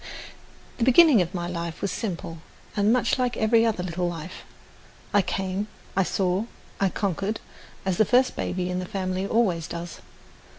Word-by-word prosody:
The - - +2
beginning 260 - +7
of 175 +1 -3
my 175 -1 -2
life 170 -2 -4
was 200 - -2
simple 170 -5 -4 0.4
and 205 +1 +3
much 250 +1 +2
like 250 -1 0
every 225 +1 +4
other 220 -6 0
little 175 0 -1
life. 170 +1 -7 0.8
I 205 - +6
came, 190 +2 -2 0.3
I 195 - +4
saw, 190 +2 0 0.3
I 195 - +3
conquered, 200 +2 -2 0.5
as 190 -2 0
the 220 - +5
first 255 +5 +3
baby 180 0 -2
in 180 - -1
the 185 - -3
family 185 -1 -2
always 185 -9 +1
does. 170 0 -6
190 Hz, 165 wpm, -25 LUFS, 180-220 Hz, 0.8 s, beginning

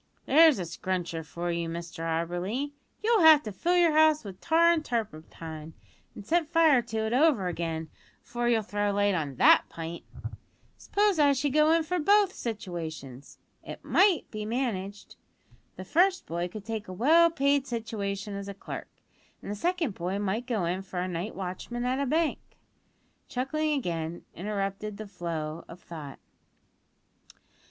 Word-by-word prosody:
There's 315 -1 +6
a 185 - -2
scruncher 170 -1 -3
for 170 +2 -4
you, 170 -1 -2
Mr 170 0 -6
Auberly. 175 - -2 0.3
You'll 450 -2 +3
have 315 -2 +8
to 215 - -5
fill 345 - +1
your 345 -2 +5
house 310 -1 +4
with 195 -3 -10
tar 335 +1 +4
an' 335 -2 +1
turpentine 160 - -5 0.4
an' - - -9
set 325 +8 +1
fire 320 -6 +5
to 225 -2 -3
it 220 - -2
over 265 - +3
again 165 -2 -3 0.4
'afore 240 0 -2
you'll 225 -2 +2
throw 205 0 -1
light 205 0 +2
on 150 -6 -2
that - - +6
pint. 165 +1 -7 0.7
S'pose 405 -4 +1
I 285 -1 +5
should 275 0 -1
go 305 +1 +4
in 330 0 +3
for 360 +3 -2
both 400 +3 +4
situations! 160 - -6 0.3
It - - -9
might 380 -4 +4
be 215 -1 -5
managed. 210 -4 -4 0.6
The 185 - -8
first 370 - +2
boy 170 +1 -3
could 205 +3 -9
take 220 -1 -4
a 185 - -7
well 320 - +5
paid 280 -3 +1
situation 210 -4 -4
as 200 0 -6
a 200 - -6
clerk, - - -7 0.5
an - - -7
the 205 - -3
second 335 - -1
boy 180 +2 -3
might 205 +4 -2
go 220 -8 0
in 180 +3 -1
for 185 -1 -4
night 180 +4 -4
watchman 195 +6 -5
at 255 +2 0
a 280 - 0
bank." 320 +3 +1 0.9
(Chuckling 305 +5 -1
again 170 -7 -4
interrupted 200 +1 -4
the 215 - -7
flow 170 -4 -5
of 170 - -11
thought.) 155 -6 -9
210 Hz, 160 wpm, -28 LUFS, 175-290 Hz, 0.9 s, have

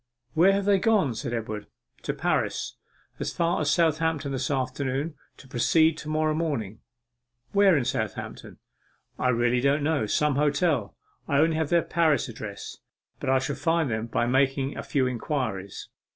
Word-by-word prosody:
'Where 175 +4 +5
have 200 0 0
they 200 -1 +4
gone?' 200 - +2
said 115 - -4
Edward. 110 -3 -4 0.3
'To - - -3
Paris - - -1 0.4
as - - -2
far 170 -1 +1
as 145 - +1
Southampton 160 -3 +1
this 135 -1 -2
afternoon, 135 +2 -2 0.2
to 135 - -15
proceed 160 +6 +3
to 150 - -7
morrow 155 0 +1
morning.' 140 -11 -2 0.7
'Where 200 -4 +5
in 130 - 0
Southampton?' - - -4 0.6
'I 125 - +2
really 120 0 +2
don't 140 +2 +2
know 145 -7 +1
some 150 +4 +1
hotel. 145 - +1 0.3
I 140 - +1
only 160 +2 +3
have 160 -2 -1
their 170 -1 +3
Paris 160 -3 +2
address. 110 -4 -8 0.4
But - - -3
I 130 - +4
shall 135 +2 -2
find 160 0 +1
them 110 +1 -2
by 120 - 0
making 135 +2 +1
a - - -4
few 135 -3 0
inquiries. 120 -6 -3
140 Hz, 165 wpm, -26 LUFS, 125-160 Hz, 0.7 s, Where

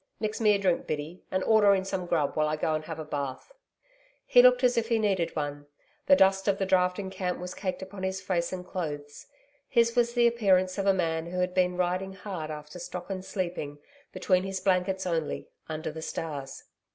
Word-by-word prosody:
Mix 215 +1 -3
me 210 -2 +5
a - - +2
drink, 185 -3 0
Biddy, 155 +4 -4
and 185 0 -1
order 210 -2 +5
in 190 0 -2
some 185 -2 -3
grub, 145 -4 0
while 155 0 +2
I 155 - 0
go 155 +1 0
and 155 0 -2
have 160 -1 -6
a 155 - -6
bath.' 140 - -5 0.7
He 245 - +7
looked 250 0 +6
as 250 0 +4
if 230 -1 +1
he 230 -1 +2
needed 195 -6 0
one. 145 -1 -4 0.4
The 280 - +8
dust 195 -3 +3
of 200 -1 +3
the 195 - 0
drafting 185 +1 +1
camp 185 -1 -2
was 180 +1 -6
caked 185 -1 -4
upon 190 0 -9
his 190 0 -2
face 170 -3 -1
and 180 -1 -5
clothes. 145 -5 -6 0.4
His 235 -1 +3
was 240 0 +2
the 240 -1 +4
appearance 195 -5 +3
of 195 - 0
a - - +7
man 165 -2 -1
who 180 +1 -5
had 180 0 0
been 180 -1 +1
riding 185 +2 -1
hard 185 -5 -6
after 150 +2 -8
stock 180 +2 -6
and 185 -1 -4
sleeping, 180 -6 -4 0.3
between 185 -2 +2
his 195 0 -3
blankets 190 0 +1
only, 165 -4 -2 0.2
under 155 0 -4
the 160 +1 -7
stars. 145 -4 -5
185 Hz, 210 wpm, -28 LUFS, 160-195 Hz, 0.7 s, The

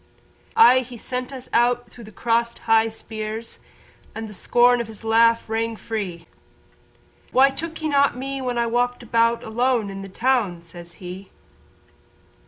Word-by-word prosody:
Aye 450 - +7
he 250 -1 -8
sent 250 +3 -4
us 260 -2 -8
out 240 +1 +2
through 235 - -12
the 215 - -12
crossed 235 +2 0
high 225 0 +4
spears 220 0 -6 0.6
And 225 0 -5
the 210 - -10
scorn 245 +4 +3
of 235 - -6
his 220 0 -10
laugh 230 +1 +3
rang 225 +1 -1
free, 195 -7 -5 1.1
"Why 270 +2 +5
took 325 +4 -6
ye - - +1
not 280 -3 +3
me 270 +1 -4
when 250 -2 -2
I 235 - +2
walked 245 +1 0
about 230 0 +2
Alone 230 -2 0
in 195 0 -7
the 195 - -8
town?" 215 -6 0
says 170 0 -12
he. 185 +2 -9
230 Hz, 160 wpm, -23 LUFS, 220-245 Hz, 1.1 s, Aye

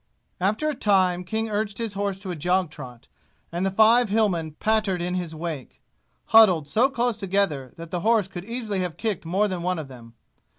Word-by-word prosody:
After 210 +11 0
a 305 - 0
time 185 -7 +2
King 220 +4 -2
urged 210 -1 -2
his 230 -3 -3
horse 200 -1 -2
to 190 -3 -5
a - - -4
jog 180 +1 0
trot, 125 -5 -11 0.4
and 175 +2 -2
the 195 - +2
five 220 +4 +4
Hillmen 190 -7 +1
pattered 215 -4 +1
in 175 +1 -2
his 175 -3 -3
wake, 155 -5 -6 0.5
huddled 185 -9 +6
so 235 - +3
close 240 -4 -1
together 195 - -1
that 165 0 -9
the 180 - -1
horse 215 0 +2
could 180 -2 -8
easily 225 -4 -3
have 180 -3 -3
kicked 210 -8 -3
more 195 +5 +2
than 185 -3 -4
one 180 +1 -1
of 155 -4 -6
them. 115 -3 -13
190 Hz, 200 wpm, -24 LUFS, 170-215 Hz, 0.5 s, huddled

